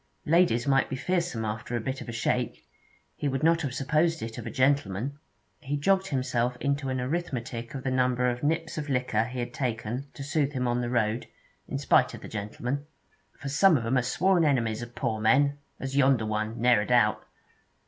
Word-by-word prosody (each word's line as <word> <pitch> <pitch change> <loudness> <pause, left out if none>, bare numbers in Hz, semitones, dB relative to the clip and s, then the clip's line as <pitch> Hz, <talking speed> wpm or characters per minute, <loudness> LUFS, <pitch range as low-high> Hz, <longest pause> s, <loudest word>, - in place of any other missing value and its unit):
Ladies 165 -7 +3
might 135 -1 +3
be - - -2
fearsome 170 -5 -1
after 110 +3 -4
a - - 0
bit 130 +4 -4
of - - -8
a - - -2
shake; 115 - -2 0.5
he 145 - -2
would 135 0 -1
not 165 +1 +4
have 135 -5 -3
supposed 155 +3 +1
it 115 0 -6
of - - -6
a - - -2
gentleman. 135 -1 0 0.4
He 145 -1 -3
jogged 190 +6 +2
himself 125 -3 0
into 140 -1 -1
an 130 0 -1
arithmetic 125 -4 -3
of 130 - -5
the 130 - -1
number 125 -1 +2
of 120 0 -1
nips 160 +1 -1
of 150 -1 -5
liquor 125 -4 +1
he 125 +1 -7
had 120 -1 -3
taken 120 +1 -3
to 140 - -6
soothe 145 0 0
him 125 -2 -1
on 120 0 +1
the 120 - -2
road, 115 -1 0 0.4
in - - -3
spite - - +3
of - - -11
the - - -8
gentleman. 120 +7 -4 0.5
'For 140 - -6
some 160 +4 +5
of 115 - -4
'em 120 +3 +1
are 130 - +4
sworn 175 +8 +2
enemies 120 -7 +1
of 120 0 -8
poor 110 -4 -2
men, 140 +6 +3 0.2
as 135 0 -4
yonder 130 -4 +4
one, 110 +1 -2
ne'er 120 -2 +4
a 105 - -4
doubt.' 110 -3 +3
130 Hz, 210 wpm, -28 LUFS, 120-145 Hz, 0.5 s, some